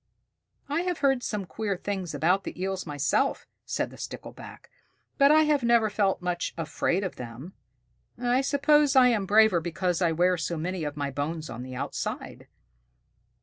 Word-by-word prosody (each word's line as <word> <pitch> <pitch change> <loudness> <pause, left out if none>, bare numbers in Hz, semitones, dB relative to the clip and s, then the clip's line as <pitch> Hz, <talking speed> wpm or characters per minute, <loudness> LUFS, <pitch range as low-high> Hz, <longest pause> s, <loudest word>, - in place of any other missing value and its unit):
"I 290 +4 0
have 360 -2 -2
heard 270 -3 +3
some 210 -5 -3
queer 205 0 -3
things 190 -3 -4
about 185 +4 +2
the - - -7
Eels 190 -1 -3
myself," 145 -1 0 0.2
said - - -2
the - - -13
Stickleback, - - -9 0.5
"but 280 0 +7
I 310 +1 +6
have 300 -2 +2
never 235 -2 +3
felt 195 -3 0
much 180 -1 -2
afraid 165 +3 -1
of 185 - -4
them. 125 +9 -8 0.6
I 245 +2 +1
suppose 285 +1 +3
I 255 -1 +7
am 210 -5 0
braver 215 -3 +5
because 175 +2 -1
I 170 -2 +3
wear 180 +3 +2
so 170 0 -3
many 175 +2 -3
of 150 0 -5
my 140 -1 -2
bones 155 +2 -4
on 120 +1 -6
the 130 0 -7
outside." 140 +2 -5
190 Hz, 170 wpm, -27 LUFS, 165-240 Hz, 0.6 s, but